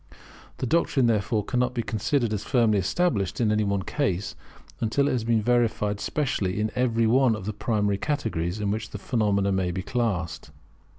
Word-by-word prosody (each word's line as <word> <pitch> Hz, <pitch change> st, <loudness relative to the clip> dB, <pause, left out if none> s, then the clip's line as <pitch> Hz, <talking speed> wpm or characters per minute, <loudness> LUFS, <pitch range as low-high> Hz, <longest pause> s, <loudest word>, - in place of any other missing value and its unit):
The -, -, -2 dB
doctrine, 140 Hz, -2 st, +2 dB
therefore, 110 Hz, -1 st, +1 dB
cannot 125 Hz, +1 st, 0 dB
be 120 Hz, -, -1 dB
considered 115 Hz, +2 st, 0 dB
as 105 Hz, -, -2 dB
firmly 115 Hz, -6 st, +2 dB
established 100 Hz, -, 0 dB
in 110 Hz, -3 st, +2 dB
any 105 Hz, 0 st, +2 dB
one 100 Hz, -1 st, 0 dB
case, 100 Hz, -9 st, -1 dB, 0.5 s
until 140 Hz, +6 st, +1 dB
it -, -, +1 dB
has 120 Hz, -3 st, 0 dB
been 115 Hz, -1 st, +1 dB
verified 110 Hz, -4 st, +1 dB
specially 105 Hz, -11 st, -1 dB
in 110 Hz, 0 st, 0 dB
every 115 Hz, -2 st, +1 dB
one 125 Hz, 0 st, +4 dB
of 100 Hz, -3 st, -7 dB
the 105 Hz, -, -3 dB
primary 105 Hz, -2 st, 0 dB
categories 110 Hz, -, -2 dB
in 100 Hz, -1 st, -1 dB
which 110 Hz, 0 st, -3 dB
phenomena 100 Hz, -2 st, 0 dB
may 95 Hz, -2 st, 0 dB
be 90 Hz, +1 st, -3 dB
classed. 90 Hz, -, -2 dB
110 Hz, 175 wpm, -26 LUFS, 100-120 Hz, 0.5 s, one